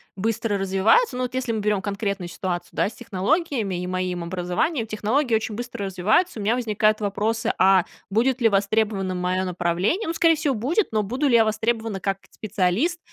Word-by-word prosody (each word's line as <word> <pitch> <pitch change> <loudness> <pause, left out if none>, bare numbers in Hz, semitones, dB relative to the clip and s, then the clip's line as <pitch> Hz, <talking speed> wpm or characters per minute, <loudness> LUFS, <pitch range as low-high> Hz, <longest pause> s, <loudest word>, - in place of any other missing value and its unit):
быстро 215 +1 -1
развиваются. 195 - +3
Ну, 255 - -2
вот 250 - -4
если 255 -3 -1
мы 220 - -2
берём 210 -2 +1
конкретную 200 -2 -3
ситуацию, 175 0 -4
да, - - +1
с - - -14
технологиями 220 - -1
и 180 - -4
моим 185 -1 -2
образованием, 185 - -1
технологии 225 +5 0
очень 220 -1 0
быстро 235 -2 -5
развиваются. 210 - +1
У - - -4
меня 220 +4 +2
возникают 215 -3 +1
вопросы: 215 +2 -1
а 190 -1 +5 0.3
будет 245 +5 +1
ли 230 - +5
востребованным 200 -2 0
моё 185 +1 0
направление? 180 - 0
Ну, 330 - -1
скорее 330 0 +4
всего, 300 -3 0
будет, 285 - 0
но 215 -1 +1
буду 255 +8 -1
ли 240 - +4
я 225 -1 +6
востребована 220 -2 -1
как 195 -1 -1
специалист, 215 - 0
215 Hz, 185 wpm, -23 LUFS, 190-240 Hz, 0.3 s, я